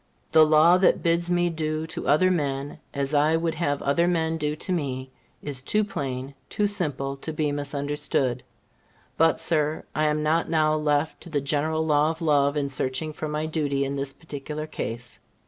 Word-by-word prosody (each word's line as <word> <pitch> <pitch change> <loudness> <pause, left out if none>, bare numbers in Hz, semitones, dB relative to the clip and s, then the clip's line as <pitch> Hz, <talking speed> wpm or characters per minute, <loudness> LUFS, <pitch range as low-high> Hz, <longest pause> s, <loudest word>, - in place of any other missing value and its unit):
The 160 - +7
law 160 +4 +6
that 185 - +3
bids 170 +1 +2
me 175 -1 +2
do 155 -1 -2
to 160 - -5
other 185 +5 +4
men 140 -4 -2
as 140 +1 -3
I 150 +2 +3
would 165 0 -1
have 145 -3 -1
other 170 +5 +2
men 165 -2 +1
do 150 -1 -2
to 185 - -5
me, 130 -5 -3 0.3
is 140 -3 -3
too 215 +10 +1
plain, 135 -8 -4 0.2
too 210 - 0
simple 145 -9 0
to 160 - -5
be 150 -1 -1
misunderstood. 145 -3 -1 0.7
But, 165 -3 +3
Sir, 155 -2 +1
I 155 - +1
am 150 0 +1
not 160 +2 +1
now 155 -1 +2
left 150 0 0
to 175 - -9
the 150 -3 0
general 155 +3 0
law 150 0 +3
of 160 0 -4
love 145 -3 +2
in 140 -1 -1
searching 135 +3 -2
for 155 - -5
my 150 +1 -2
duty 145 -3 -1
in 140 +1 -3
this 140 0 -2
particular 150 0 -7
case. 120 -5 -6
150 Hz, 185 wpm, -25 LUFS, 140-160 Hz, 0.7 s, The